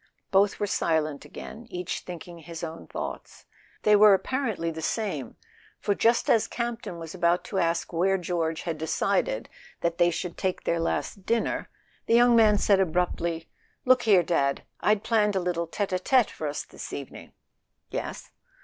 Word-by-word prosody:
Both 195 +1 +3
were 205 - +1
silent 155 -6 0
again, 230 +2 -9
each 180 -3 -3
thinking 175 -1 -9
his 165 0 -8
own 165 0 -6
thoughts. - - -7 0.4
They 210 - +6
were 205 -1 +8
apparently 220 -7 -2
the 160 0 -6
same, 160 - -2 0.4
for 205 - +1
just 230 +4 +2
as 225 - +4
Campton 235 -6 -4
was 165 -1 -7
about 175 -1 +2
to 190 - -2
ask 170 0 0
where 190 +3 +2
George 165 -3 -2
had 165 -3 -3
de¬ 160 - -3
cided - - 0 0.3
that 170 0 -1
they 175 - +5
should 175 0 -4
take 185 -1 -1
their 170 - 0
last 185 +3 -2
dinner, 230 0 0 0.4
the 230 - +4
young 240 0 +6
man 215 -2 +6
said 200 -1 +3
abruptly: 170 -2 0 0.4
"Look 255 -1 +5
here. 200 -6 +5
Dad; 140 -5 0 0.2
I'd 210 -1 +2
planned 210 -3 +2
a - - +3
little 175 -2 -1
tete 195 +3 -2
a 185 - +1
tete 250 +4 +3
for 155 - -4
us 145 - -3
this - - -9
evening." 140 -2 -8 0.6
"Yes - - -5
180 Hz, 175 wpm, -27 LUFS, 165-210 Hz, 0.6 s, were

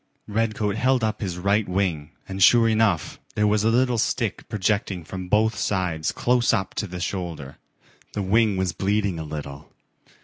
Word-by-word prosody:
Redcoat 110 -1 -1
held 125 0 +2
up 110 0 -1
his 90 -4 -3
right 100 +2 +1
wing 90 -6 -1 0.2
and 95 0 -5
sure 115 +4 +6
enough 110 -7 +1 0.2
there 105 - +2
was 105 0 +2
a 110 - +3
little 120 0 +2
stick - - -1
projecting 100 -3 -1
from 95 +2 -7
both 110 +3 +3
sides 90 -7 -1
close 120 0 +2
up 95 0 -1
to 105 - -5
the 90 -1 -7
shoulder. 85 -7 -5 0.6
The 100 - -2
wing 105 +1 +2
was 95 -2 0
bleeding 100 -1 0
a - - -4
little. 75 -1 -7
100 Hz, 170 wpm, -24 LUFS, 90-110 Hz, 0.6 s, sure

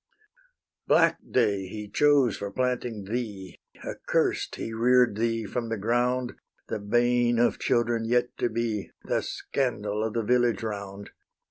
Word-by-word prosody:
Black - - +4
day 100 -6 +1
he 105 +2 -7
chose 140 -1 +3
for 100 - -5
planting 125 -2 -2
thee, 105 -5 -5 0.2
Accurst - - -1
he 115 - -5
rear'd 125 0 +4
thee 115 0 -1
from 115 +3 -3
the 115 - -2
ground, 120 +4 0 0.4
The 110 - -2
bane 120 +3 +2
of 120 - +2
children 120 -1 +1
yet 120 +1 +1
to 120 - +1
be, 110 -3 -2
The - - 0
scandal 110 -5 -2
of 110 -1 -2
the 115 - 0
village 120 -1 +2
round. 100 -2 -6
115 Hz, 140 wpm, -27 LUFS, 105-120 Hz, 0.4 s, Black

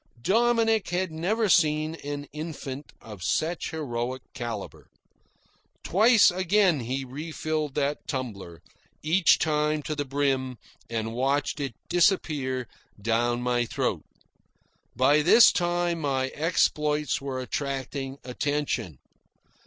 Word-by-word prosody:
Dominick 225 - +2
had 180 0 -1
never 200 +8 0
seen 155 -3 +3
an 145 0 -4
infant 150 -3 -6
of 105 -4 -11
such 160 - -1
heroic 130 -4 -4
calibre. 115 -5 -6 1.0
Twice 220 +3 +5
again 185 -2 +2
he 130 +3 -3
refilled 155 +1 -4
the 145 0 0
tumbler, 100 - -5 0.4
each 170 +4 +4
time 150 -1 0
to 155 - -3
the 145 -1 -2
brim, 135 -2 -1 0.3
and 115 -1 -3
watched 135 +5 0
it 135 -5 -4
disappear 150 - +1 0.3
down 120 +3 0
my 120 -1 +1
throat. 115 - -2 0.9
By 140 +5 +4
this 205 +9 +7
time 175 -1 0
my 135 -2 0
exploits 150 -2 0
were 135 -2 -4
attracting 135 0 -4
attention. 140 - -2
145 Hz, 110 wpm, -26 LUFS, 130-165 Hz, 1.0 s, this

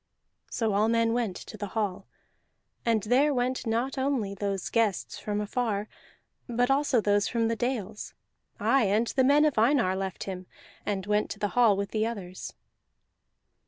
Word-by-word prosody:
So 225 -3 0
all 210 +2 +3
men 230 0 +2
went 230 -6 -1
to 215 - -9
the 205 0 -4
hall; 205 -4 -2 0.8
and 225 -3 +2
there 260 +7 +3
went 250 0 -1
not 245 +5 -1
only 260 -7 0
those 200 -1 -3
guests 220 -5 0
from 210 -1 -2
afar, 210 -1 -1 0.6
but 245 +2 +1
also 275 -2 +3
those 205 0 +2
from 230 -2 0
the 230 - 0
dales. 225 -4 -3 0.4
Aye, 230 +4 +3
and 210 +4 +2
the 260 - +2
men 290 +3 +5
of 295 -7 +2
Einar 230 -5 +3
left 190 -1 -4
him, 185 -2 -6 0.4
and 195 -2 -1
went 210 +1 +1
to - - -5
the 205 0 -1
hall 230 -4 +4
with 200 -1 -3
the 220 0 +1
others. 190 -5 -6
220 Hz, 165 wpm, -28 LUFS, 200-245 Hz, 0.8 s, men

